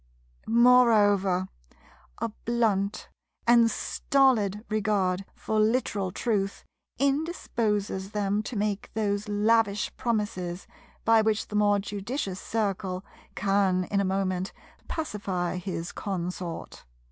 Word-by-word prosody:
Moreover 215 -6 +5 0.7
a - - -2
blunt 215 -3 -1 0.4
and 235 -1 +6
stolid 225 -4 +1
regard 195 -3 0
for 220 - -1
literal 215 -4 +1
truth 195 -1 -1 0.3
indisposes 230 - -1
them 205 0 0
to 220 +3 -6
make 205 -1 -1
those 205 -1 -1
lavish 210 0 +2
promises 205 -7 -2 0.4
by 225 0 +6
which 220 0 0
the 210 - -5
more 205 -1 +4
judicious 200 0 -4
Circle 195 -4 -2 0.3
can 195 -2 +2
in 200 - +2
a - - +1
moment 190 -1 -1 0.3
pacify 195 - -2
his 180 -2 -4
consort. 180 -3 -5
205 Hz, 100 wpm, -27 LUFS, 195-225 Hz, 0.7 s, and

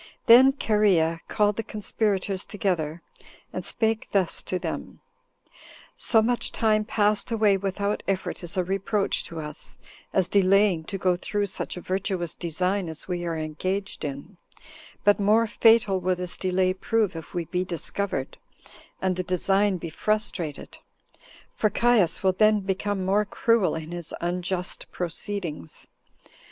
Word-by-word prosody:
Then 260 +4 +8
Cherea 185 -8 +2
called 210 -1 +1
the - - 0
conspirators 205 -2 -2
together, 170 -5 -2 0.5
and - - -4
spake 220 -1 0
thus 190 -4 +1
to 185 - -3
them: - - -5 1.0
"So 225 -2 +3
much 245 +1 0
time 215 -1 +2
passed 210 -1 +1
away 215 -3 +3
without 200 +1 -2
effort 190 -1 -2
is 175 +3 -6
a 185 - +2
reproach 195 +2 0
to 165 - -6
us, 150 0 -8 0.3
as 190 -2 +2
delaying 195 -3 +3
to 195 - -4
go 185 -1 +2
through 205 +3 -2
such 195 - -5
a - - -6
virtuous 185 -3 -1
design 180 +2 -1
as 160 -1 -7
we 175 -1 -3
are 165 -1 -2
engaged 185 +6 -3
in; 140 +6 -6 0.7
but 205 0 +4
more 215 +3 +4
fatal 225 -3 +4
will 185 0 0
this 180 0 -4
delay 185 0 +1
prove 210 0 0
if 165 +1 -9
we 175 -1 -1
be 180 +3 -1
discovered, 180 -4 -2 0.7
and 185 -1 +1
the - - 0
design 195 +2 +1
be 165 -1 -7
frustrated; 180 -6 -2 0.7
for 215 - +1
Caius 210 -7 +2
will 190 -1 +3
then 215 +2 +4
become 195 0 -2
more 200 +3 +3
cruel 225 0 +1
in 160 0 -6
his 175 -2 -5
unjust 180 +1 -2
proceedings. 175 -2 -5
190 Hz, 145 wpm, -25 LUFS, 175-210 Hz, 1.0 s, Then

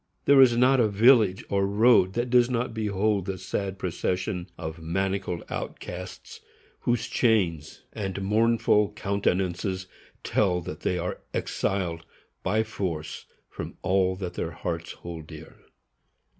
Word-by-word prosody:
_ - - -42
There 140 -1 +7
is 120 -3 +6
not 130 +2 +5
a 115 - +4
village 105 -2 +4
or 100 -1 +1
road 105 -2 +4
that 120 +2 -2
does 125 -1 +5
not 120 -1 -1
behold 105 -2 0
the 95 -1 -3
sad 95 +1 -3
procession 90 0 -2
of 80 0 -6
manacled 95 +1 -2
outcasts, 90 +1 -7 0.4
whose 120 -1 0
chains 90 - 0
and 100 -2 -4
mournful 105 0 +3
countenances 95 -2 -1 0.4
tell 90 -4 +1
that 75 -2 -7
they 90 - -1
are 90 +1 -3 0.2
exiled 85 -4 -2 0.4
by 105 +4 +1
force 90 -8 -5 0.2
from - - -8
all 95 0 +2
that 90 -2 -5
their 80 - -3
hearts 85 +1 -4
hold 85 -3 -9
dear. 80 -1 -11
95 Hz, 135 wpm, -26 LUFS, 90-110 Hz, 0.4 s, There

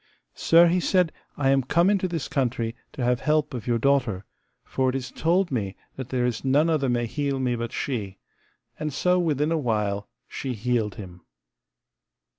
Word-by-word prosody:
Sir, 165 +1 +5
he 175 +2 +3
said, 180 -2 +2 0.3
I 135 -2 +2
am 135 0 +4
come 170 +7 +2
into 195 -2 +2
this 165 -6 -3
country 120 -4 -1 0.2
to 130 - -4
have 125 0 +2
help 150 -1 +1
of 120 -2 -6
your 120 -1 +2
daughter, 120 -7 +1 0.4
for 130 -1 0
it 130 - -2
is 130 -2 -4
told 175 +2 +1
me 105 -6 -2 0.2
that 130 -2 -7
there 125 -2 0
is 120 -3 -2
none 145 +5 +3
other 140 -4 +1
may 120 -1 +1
heal 140 +2 -2
me 125 -2 0
but 115 0 -4
she; 105 -8 -3 0.6
and 155 0 -2
so 180 +6 +2
within 155 -2 +1
a 165 - +1
while 105 -5 -1 0.2
she 130 -2 -4
healed 110 -2 -1
him. 90 -5 -10
130 Hz, 185 wpm, -25 LUFS, 115-155 Hz, 0.6 s, Sir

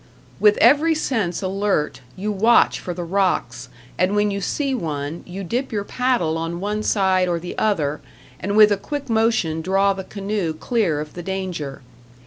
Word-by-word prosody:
With 210 -1 +5
every 300 +6 +5
sense 220 - -1
alert, 190 -7 -1
you 205 +3 -3
watch 220 +4 +4
for 180 - -5
the 175 0 -4
rocks, 165 -9 -1 0.3
and 185 +3 +2
when 205 0 +2
you 200 0 -3
see 275 +8 -1
one, 155 - -3
you 190 +2 -6
dip 245 +9 -2
your 205 -2 -1
paddle 205 -10 0
on 165 +1 -3
one 210 +2 -2
side 190 -3 +2
or 170 -1 0
the 175 +1 -7
other 155 -9 0 0.4
and 200 +3 -1
with 215 -1 +8
a 205 - +2
quick 285 +4 -5
motion 220 -8 +1
draw 195 +3 +2
the 190 0 -6
canoe 200 -5 -3
clear 185 - 0
of 150 0 -8
the 175 - -6
danger. 175 -8 -4
195 Hz, 175 wpm, -21 LUFS, 170-215 Hz, 0.4 s, with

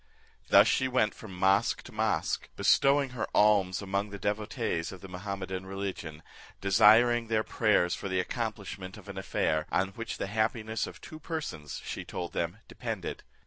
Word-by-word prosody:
Thus - - +8
she 130 - +2
went 125 -4 +2
from 95 -5 -10
mosque 95 +4 +2
to - - -11
mosque, - - -1
bestowing 140 -1 +4
her 125 -3 -3
alms 100 -3 +4
among 100 +1 -1
the 100 - -7
devotees 105 -5 -2
of 95 -2 -10
the 95 - -8
Mahummedan 95 0 -5
religion, 95 -5 -5 0.4
desiring 115 +4 +5
their 110 -1 +1
prayers 105 -7 +2
for 100 - -4
the 95 0 +1
accomplishment 100 -3 -4
of 105 -1 -14
an 100 - -7
affair, 80 -4 0
on 95 +1 +1
which 115 +4 -6
the - - -2
happiness 110 +1 -1
of - - -11
two 155 - -10
persons, 150 - -5
she - - -4
told 85 -1 -5
them, 85 +3 -2
depended. 110 -7 -5
100 Hz, 165 wpm, -30 LUFS, 95-110 Hz, 0.4 s, Thus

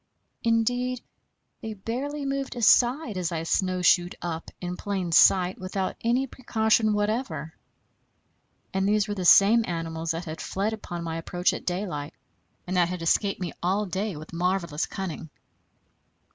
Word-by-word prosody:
Indeed, 245 +2 +1 0.6
they 220 -1 -5
barely 275 +8 -4
moved 275 -1 -3
aside 240 0 +3
as 180 -2 -1
I 165 -1 -2
snowshoed 180 0 +2
up, 165 -1 -5
in 180 0 -4
plain 190 -3 -3
sight, 185 +4 +5
without 185 0 -3
any 245 +3 +1
precaution 220 -4 +1
whatever. 205 - -2 1.2
And 190 +1 +1
these 210 -1 +2
were 205 - -2
the 190 -3 -4
same 210 +6 +7
animals 165 -1 -4
that 165 +2 -2
had 160 -1 -6
fled 205 +3 -2
upon 175 -5 -6
my 165 -1 -3
approach 175 +2 0
at - - -7
daylight, 175 -6 -3 0.5
and 180 +1 -2
that 175 -1 +3
had 180 -2 -4
escaped 195 +4 +1
me 180 -3 -4
all 195 +4 +1
day 195 0 -3
with 155 +3 -10
marvelous 175 -3 -1
cunning. 175 -4 -5
190 Hz, 145 wpm, -26 LUFS, 175-220 Hz, 1.2 s, same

